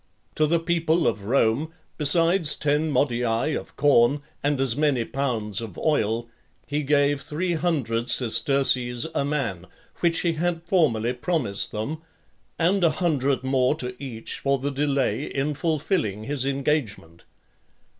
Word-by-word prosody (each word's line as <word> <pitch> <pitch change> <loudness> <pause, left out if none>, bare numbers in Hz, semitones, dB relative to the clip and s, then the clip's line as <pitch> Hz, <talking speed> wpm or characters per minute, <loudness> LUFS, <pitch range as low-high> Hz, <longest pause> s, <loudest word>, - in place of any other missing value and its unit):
To 155 - +2
the 170 +2 +2
people 165 0 +1
of 105 -4 -2
Rome, 135 +6 +1 0.2
besides 165 +2 +3
ten 150 +2 0
modii 125 0 0
of - - -7
corn, 140 0 +3 0.2
and 145 -1 0
as 130 -4 0
many 145 -5 +1
pounds 115 -7 -2
of 110 -6 -8
oil, 115 -6 0 0.4
he 145 +1 -2
gave 145 0 +2
three 165 +5 -2
hundred 130 -9 -1
sesterces 125 0 +2
a - - 0
man, 135 - -3 0.3
which 170 -1 +2
he 170 -2 +1
had 165 +1 -2
formerly 140 - +1
promised 125 - -1
them, 140 +10 -4 0.6
and 180 +3 +2
a 170 - +5
hundred 145 -5 0
more 130 +1 +2
to 125 -4 -5
each 115 -4 -5
for 140 0 +1
the 140 +2 -3
delay 140 0 0
in 140 +2 -2
fulfilling 150 - -1
his 135 +2 -2
engagement. 135 - -2
140 Hz, 140 wpm, -24 LUFS, 120-155 Hz, 0.6 s, a